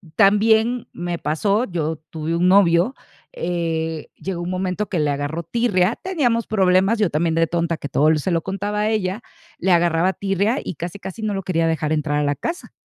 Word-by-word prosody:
también 220 +4 +3
me 175 0 -3
pasó, 200 +9 +1
yo 160 -5 -2 0.2
tuve 160 +1 -2
un 175 +2 +2
novio, 185 +3 +4 0.4
eh, 165 - -2
llegó 185 -2 -5
un 175 - -4
momento 185 +2 -2
que 180 - -1
le 150 -1 +1
agarró 145 +4 -3
tirria, 205 0 +1
teníamos 260 -11 0
problemas, 190 +1 +3
yo 210 -4 +2
también 160 +2 0
de 165 0 +3
tonta, 170 0 -1
que 140 - -6
todo 150 +3 +3
l 155 -1 +3
se 180 +5 -2
lo 165 - +1
contaba 205 +3 -3
a 215 - +1
ella, 210 -1 -1 0.4
le 190 - +1
agarraba 175 +1 +3
tirria 200 +7 0
y - - -5
casi, 175 +5 -6
casi 190 +3 -8
no 215 -1 -1
lo 195 - -3
quería 165 -2 +1
dejar 155 -1 0
entrar 150 -1 0
a - - +1
la 145 0 0
casa. 340 - -5
180 Hz, 200 wpm, -21 LUFS, 165-205 Hz, 0.4 s, novio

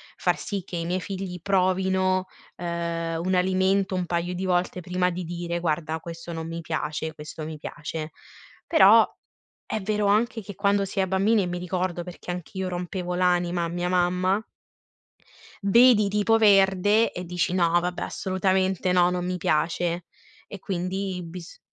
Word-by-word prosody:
far - - +1
sì 200 -5 -4
che 175 - -6
i 165 - -3
miei 180 +2 -1
figli 185 -2 -5
provino, 185 0 +1 0.3
uhm, 170 -1 -3
un 185 0 +1
alimento 190 +1 +2
un 180 -1 -1
paio 175 +1 -2
di 185 +1 -3
volte 180 0 0
prima 180 +1 0
di 180 0 -4
dire: 170 0 -3
"Guarda 160 -1 -1
questo 170 +1 -8
non 165 -1 -5
mi 165 0 -5
piace, 160 -1 -3
questo 155 0 -8
mi 155 0 -6
piace." 155 0 -6 0.5
Però - - +7 0.6
è 220 - -3
vero 210 +1 0
anche 225 +3 +2
che 205 -1 -9
quando 200 0 +2
si 195 +1 -4
è 190 - 0
bambini 200 +4 +3
e - - -2
mi 175 0 -3
ricordo 180 -1 -2
perché 180 0 -7
anch'io 185 +2 -4
rompevo 180 0 -4
l'anima 175 -1 +1
a - - -2
mia 175 +1 -2
mamma. 180 +2 +2 1.2
Vedi, 220 +1 +6
tipo, 210 +2 +2
verde 205 +1 +4
e 180 - -6
dici: 175 0 -1
"No, 175 -2 +3
vabbè 180 0 -3
assolutamente 190 -1 0
no, 175 -1 +5
non 180 0 -2
mi 180 0 -1
piace." 170 +2 0 0.4
E 205 - -8
quindi 185 0 -3
bis 170 0 -9
180 Hz, 165 wpm, -25 LUFS, 170-190 Hz, 1.2 s, Però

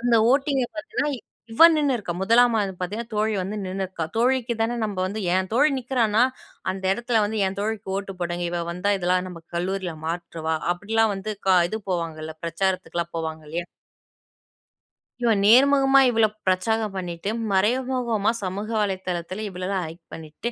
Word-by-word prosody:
அந்த 240 0 +2 0.2
ஓட்டிங்க 275 -1 +2
பார்த்தீங்கன்னா. 315 0 -2 0.4
இவ 230 - +7
நின்னுருக்கா. 255 - 0
முதலாமாண்டு 230 +3 +4 0.2
பார்த்தீங்கன்னா 220 +6 -4
தோழி 215 +1 +1
வந்து 200 +3 -4
நின்னுருக்கா. 185 -3 -3
தோழிக்கு 245 0 +2
தான 230 +2 +1
நம்ம 205 -2 -3
வந்து 210 +3 -4
என் 185 0 +1
தோழி 290 +5 +5
நிக்கிறானா, 240 -3 +2 0.5
அந்த 190 0 -8
இடத்துல 235 +1 +1
வந்து 220 +1 -2
என் 190 +1 -4
தோழிக்கு 215 -1 -3
ஓட்டு 195 -1 -5
போடுங்க. 175 0 -2
இவ 175 0 -2
வந்தா, 190 +4 0
இதெல்லாம் 180 +1 +1
நம்ம 170 -2 -10
கல்லூரில 185 -1 -2
மாற்றுவா, 165 -1 -3 0.2
அப்படிலாம் 215 +4 +1
வந்து 195 +2 -4 0.2
க 185 - +6
இது 220 - -2
போவாங்கல்ல? 160 -3 -3
பிரச்சாரத்துக்குலாம் 170 -1 -2
போவாங்க 160 -1 -4
இல்லையா? 170 +2 -3 1.6
இவ 230 - +4
நேர்முகமா 270 +4 +6
இவ்ளோ 225 -2 +4 0.2
பிரச்சாரம் 210 +3 +1
பண்ணிட்டு, 180 0 -4 0.2
மறைமுகமா 235 +1 +1
சமூக 195 +3 -3
வலைதளத்துல 185 0 -3
இவ்வளலாம் 185 0 -3
ஹயிட் 165 +1 -12
பண்ணிட்டு. 160 +9 -6
195 Hz, 145 wpm, -24 LUFS, 180-230 Hz, 1.6 s, இவ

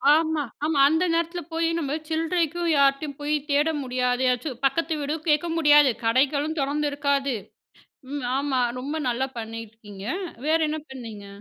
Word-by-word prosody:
ஆமா, 320 -1 +1 0.2
ஆமா. 305 -3 +1
அந்த 320 +3 +2
நேரத்தில 335 +1 -1
போய் 330 0 +1
நம்ம 290 -1 -2
சில்றைக்கும் 330 +1 0
யார்ட்டயும் 275 +1 +2
போய் 295 +1 0
தேட 290 +2 +3 0.2
முடியாது. 250 0 0
ஏதாச்சு 250 +4 -1
பக்கத்து 320 +4 +1
வீடு 290 +2 -1
கேட்க 300 +3 +2
முடியாது, 295 -4 +6
கடைகளும் 285 +6 +2
தொறந்துருக்காது. 280 -2 0 0.8
ம் 285 -3 -3
ஆமா. 275 -2 0 0.2
ரொம்ப 290 +5 -4
நல்லா 260 +2 0
பண்ணியிருக்கீங்க! 220 -3 -8 0.4
வேற 320 +1 +4
என்ன 310 +1 -2
பண்ணீங்க? 225 -6 -8
285 Hz, 135 wpm, -25 LUFS, 255-315 Hz, 0.8 s, முடியாது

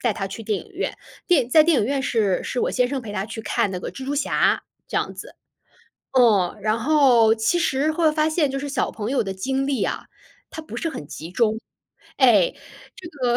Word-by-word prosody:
带 235 -4 0
她 195 -3 -3
去 195 +4 -8
电 210 -2 -1
影 400 - -20
院， 365 - -3 0.3
电 290 -10 +3
在 310 +3 +7
电 325 -3 +3
影 205 - +1
院 275 0 -1
是， 215 -7 0
是 - - -4
我 - - 0
先 250 -1 +1
生 270 -1 -3
陪 210 -3 -7
她 195 0 -3
去 225 0 -7
看 205 - 0
那 185 - -4
个 - - -6
《蜘 265 - -8
蛛 285 - -1
侠》， 285 0 +1 0.3
这 - - -3
样 - - -1
子。 - - -10 0.8
嗯， 215 -8 +3
然 215 +1 0
后 245 -3 +4
其 220 +10 +1
实 310 -2 +1
会 315 -1 +2
发 305 0 +1
现 310 -3 +1
就 275 - -3
是 285 +1 -5
小 275 - -1
朋 220 +4 -4
友 270 - +2
的 195 - -4
精 265 +8 -2
力 270 -6 0
啊， - - -4 0.4
她 315 - -7
不 315 - -9
是 330 - -2
很 145 - -8
集 160 +2 -9
中。 220 +2 +1 0.6
哎， 225 -9 +4 0.4
这 360 - -11
个 250 -5 0
250 Hz, 245 characters per minute, -22 LUFS, 215-285 Hz, 0.8 s, 在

